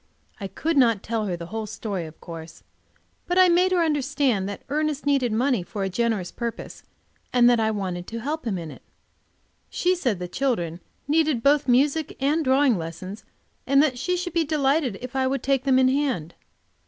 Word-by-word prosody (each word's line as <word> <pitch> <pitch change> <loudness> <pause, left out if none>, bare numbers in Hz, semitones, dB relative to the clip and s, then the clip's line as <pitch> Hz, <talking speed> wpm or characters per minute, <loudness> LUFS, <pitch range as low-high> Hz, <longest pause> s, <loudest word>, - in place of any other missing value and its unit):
I 195 - -4
could 315 +10 -2
not 230 -6 +4
tell 220 -2 -2
her 180 -2 -2
the 170 - -7
whole 220 -1 -3
story, 200 -5 -4
of 155 - -14
course, 165 -1 -10 0.6
but 355 - 0
I 370 -1 +7
made 360 +2 +3
her 355 -2 +3
understand 275 -9 0
that 200 - -7
Ernest 300 0 -1
needed 275 -4 +2
money 245 0 +1
for 195 +3 -5
a 195 - -1
generous 215 -2 -1
purpose, 235 -1 -6 0.5
and 245 -1 +5
that 240 -1 +4
I 220 -1 +2
wanted 185 -4 -3
to 230 - -5
help 295 +3 -4
him 200 -4 -1
in 165 -3 -6
it. - - -13 0.9
She 360 +1 +1
said 255 - -1
the 180 0 -5
children 175 -7 -1 0.3
needed 300 -5 +2
both 285 -1 +3
music 280 +5 +2
and 295 +4 +1
drawing 265 - +3
lessons, 185 +6 -7 0.4
and 275 +1 +4
that 255 -5 0
she 360 +5 0
should 355 -1 -4
be 335 -1 +2
delighted 285 -6 +1
if 255 +1 -8
I 260 -1 +2
would 270 -2 -2
take 270 -1 +1
them 265 -2 +4
in 260 0 +5
hand. 260 - -1
255 Hz, 195 wpm, -24 LUFS, 205-290 Hz, 0.9 s, I